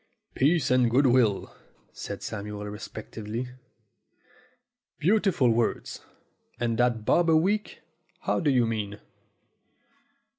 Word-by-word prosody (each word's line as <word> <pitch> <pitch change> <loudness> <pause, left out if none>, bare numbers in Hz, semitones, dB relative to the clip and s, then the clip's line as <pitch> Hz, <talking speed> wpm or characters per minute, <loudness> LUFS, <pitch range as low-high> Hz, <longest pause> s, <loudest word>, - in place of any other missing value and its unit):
"Peace 155 +1 +2
and 125 -2 +4
good 130 +5 +3
will," 120 -6 +2 0.4
said - - -7
Samuel 105 0 -5
reflectively. 110 +3 -6 1.5
"Beautiful 185 - +3
words! 115 0 -1 0.6
And 115 -1 -1
that 120 -3 +1
bob 170 +6 +3
a 160 - +6
week? 205 +6 -1 0.4
How - - 0
do 160 - +1
you 125 -3 +3
mean?" 105 -2 -3
120 Hz, 105 wpm, -27 LUFS, 110-145 Hz, 1.5 s, a